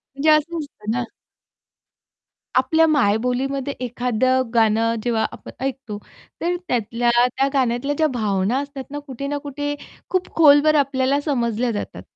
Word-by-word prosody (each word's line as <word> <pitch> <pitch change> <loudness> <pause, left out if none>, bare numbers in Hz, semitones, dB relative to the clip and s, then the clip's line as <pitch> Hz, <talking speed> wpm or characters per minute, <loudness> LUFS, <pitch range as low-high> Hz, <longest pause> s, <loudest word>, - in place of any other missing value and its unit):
म्हणजे 310 +3 +3
असं 310 +2 +2
असतं 250 -8 -7
ना. 245 +1 -1 1.5
आपल्या 320 +6 +4
मायबोलीमध्ये 265 +1 +1
एखादं 250 +1 0
गाणं 225 0 +3
जेव्हा 230 -2 +1
आपण - - -10
ऐकतो, 260 -6 -4 0.4
तर 350 +1 0
त्यातल्या 235 0 0 0.3
त्या 275 - +2
गाण्यातल्या 255 +2 +1
ज्या 315 - +4
भावना 210 +1 0
असतात 280 -1 -6
ना, 290 - -5
कुठे 275 -2 -7
ना 290 +1 -2
कुठे 290 0 -3 0.4
खूप 370 -1 -1
खोलवर 305 -1 +6
आपल्याला 270 +1 0
समजल्या 240 -4 0
जातात. 205 - -5
260 Hz, 135 wpm, -21 LUFS, 235-290 Hz, 1.5 s, खोलवर